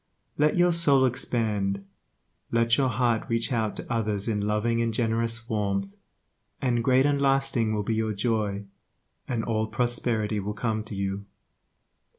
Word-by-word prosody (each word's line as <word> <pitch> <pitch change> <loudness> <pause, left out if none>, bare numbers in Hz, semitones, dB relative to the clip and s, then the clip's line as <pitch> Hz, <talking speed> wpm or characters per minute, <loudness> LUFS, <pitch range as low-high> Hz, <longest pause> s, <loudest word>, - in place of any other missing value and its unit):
Let 150 +3 +2
your 175 0 +4
soul 140 -6 +5
expand, 105 -5 -1 0.7
let 115 0 +3
your 135 -1 +2
heart 120 -1 0
reach 115 +3 0
out 110 -3 0
to - - -5
others 105 -2 -1
in 105 -3 0
loving 105 +3 0
and 115 0 0
generous 115 +1 0
warmth, 100 -3 -1 0.7
and 120 -3 0
great 130 +2 +4
and 145 -1 +1
lasting 135 -5 +2
will 105 - -1
be 110 - -1
your 110 0 0
joy, 105 -1 -1 0.6
and 120 -3 -1
all 110 -1 -1
prosperity 115 -3 0
will 105 +1 -4
come 110 -1 -1
to 105 - -7
you. 100 +1 -3
115 Hz, 155 wpm, -26 LUFS, 105-120 Hz, 0.7 s, soul